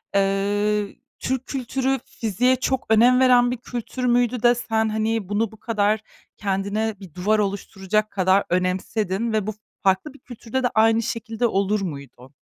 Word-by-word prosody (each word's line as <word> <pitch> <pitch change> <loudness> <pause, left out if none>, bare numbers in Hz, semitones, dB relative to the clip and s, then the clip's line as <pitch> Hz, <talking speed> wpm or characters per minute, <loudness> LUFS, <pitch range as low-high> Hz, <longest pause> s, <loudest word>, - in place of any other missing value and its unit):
eee, 200 +1 +1 0.2
Türk 260 0 -2
kültürü 265 0 -1
fiziğe 240 +3 +1
çok 260 0 -1
önem 240 +3 +5
veren 245 -2 +5
bir 250 - -2
kültür 245 +1 -5
müydü 245 -1 +2
de 240 0 +6
sen 225 -2 0
hani 220 -2 -1
bunu 205 +1 0
bu 220 - -14
kadar 215 -2 +1 0.4
kendine 200 +2 -1
bir 185 -6 -12
duvar 210 +5 +1
oluşturacak 200 +1 -1
kadar 190 0 +3
önemsedin 190 +4 -1
ve 215 -2 0
bu 215 - -2 0.3
farklı 190 +8 +1
bir 285 - -17
kültürde 245 +1 -5
de - - +4
aynı 225 +1 +4
şekilde 230 0 -2
olur 200 0 0
muydu? 140 -6 -8
220 Hz, 155 wpm, -23 LUFS, 200-240 Hz, 0.4 s, de